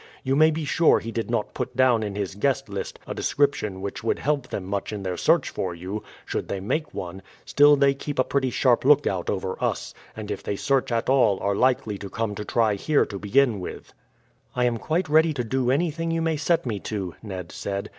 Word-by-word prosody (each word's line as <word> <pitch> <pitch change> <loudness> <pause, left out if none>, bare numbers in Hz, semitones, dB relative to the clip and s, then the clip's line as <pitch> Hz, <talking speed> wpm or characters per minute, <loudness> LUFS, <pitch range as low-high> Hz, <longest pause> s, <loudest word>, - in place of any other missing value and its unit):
You 135 0 +1
may 155 +2 +6
be 160 0 -2
sure 160 +3 +4
he 115 - -5
did 115 0 -3
not 115 -3 -1
put - - -4
down 130 -3 +4
in 105 -2 -4
his 100 -2 -3
guest 135 +5 0
list 100 -1 -5
a - - -5
description 110 -9 0
which 100 +2 -5
would 115 - +1
help 140 -3 -1
them 100 - -4
much 100 +2 -3
in 105 -2 -5
their 90 -1 -2
search - - +2
for 90 -2 -3
you, 95 +5 -5 0.2
should - - -3
they 100 - -3
make 150 +11 -2
one, 90 +1 -6 0.2
still 145 +1 +6
they 140 -1 +4
keep 145 +1 -6
a 130 - +4
pretty 130 0 0
sharp 125 -1 +2
lookout 130 -11 +3
over 95 0 -3
us, - - -2 0.2
and - - -5
if - - -4
they 100 - -3
search 135 +4 0
at 115 0 0
all 125 -7 +3
are 100 - +1
likely 125 -3 +1
to 100 - -7
come 110 0 -2
to 105 - -5
try 110 0 +2
here 145 +9 +2
to 100 -2 -7
begin 115 +1 +2
with." 90 - -8 0.6
"I 125 0 +2
am 120 -2 0
quite 165 +7 -1
ready 155 +1 +4
to 125 - -1
do 125 +2 0
anything 165 +3 0
you 165 0 0
may 165 -1 +1
set 160 +2 +1
me 110 -5 -2
to," 95 -4 -4
Ned 95 -5 -7
said. 100 0 -4
120 Hz, 225 wpm, -25 LUFS, 100-140 Hz, 0.6 s, may